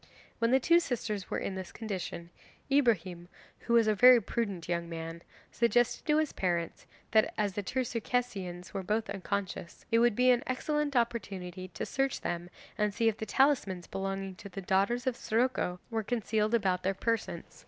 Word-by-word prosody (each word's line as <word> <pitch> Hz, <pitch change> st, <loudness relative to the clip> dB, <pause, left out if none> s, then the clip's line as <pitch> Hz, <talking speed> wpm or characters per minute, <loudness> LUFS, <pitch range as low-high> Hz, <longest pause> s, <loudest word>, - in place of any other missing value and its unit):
When 230 Hz, 0 st, +2 dB
the 260 Hz, +2 st, +5 dB
two 335 Hz, +6 st, +5 dB
sisters 215 Hz, -, -3 dB
were -, -, -1 dB
in -, -, -3 dB
this 190 Hz, -1 st, -6 dB
condition, 185 Hz, -5 st, -5 dB, 0.4 s
Ibrahim, 190 Hz, -, +2 dB, 0.3 s
who 235 Hz, -, -2 dB
was 230 Hz, -1 st, +6 dB
a 215 Hz, -, +3 dB
very 250 Hz, +4 st, +8 dB
prudent 200 Hz, -5 st, -3 dB
young 170 Hz, -1 st, -2 dB
man, 165 Hz, 0 st, -6 dB, 0.3 s
suggested 240 Hz, +3 st, +1 dB
to 300 Hz, 0 st, +4 dB
his 310 Hz, -1 st, +1 dB
parents 170 Hz, -3 st, -2 dB, 0.2 s
that, 220 Hz, 0 st, +4 dB
as 205 Hz, -2 st, 0 dB
the 205 Hz, -, -2 dB
two 255 Hz, +7 st, -1 dB
Circassians 220 Hz, -7 st, -3 dB
were 195 Hz, -, -2 dB
both 210 Hz, +2 st, -1 dB
unconscious, 195 Hz, -3 st, -4 dB
it 230 Hz, -, +5 dB
would 240 Hz, -2 st, +4 dB
be 250 Hz, +2 st, +5 dB
an 240 Hz, -1 st, +3 dB
excellent 295 Hz, +2 st, -1 dB
opportunity 195 Hz, -6 st, -2 dB
to 175 Hz, -, -5 dB
search 270 Hz, -1 st, -1 dB
them 175 Hz, 0 st, -3 dB, 0.3 s
and 210 Hz, 0 st, +2 dB
see 225 Hz, -1 st, +3 dB
if 220 Hz, -, -4 dB
the 220 Hz, -, -5 dB
talismans 225 Hz, -11 st, +2 dB
belonging 195 Hz, 0 st, -4 dB
to 200 Hz, -, -9 dB
the 195 Hz, -, -7 dB
daughters 195 Hz, +6 st, +1 dB
of 260 Hz, -2 st, +1 dB
Siroco 230 Hz, -6 st, 0 dB
were 225 Hz, -1 st, 0 dB
concealed 220 Hz, 0 st, 0 dB
about 190 Hz, -5 st, +1 dB
their 190 Hz, +1 st, 0 dB
persons. 230 Hz, +3 st, -3 dB
210 Hz, 180 wpm, -31 LUFS, 185-240 Hz, 0.4 s, very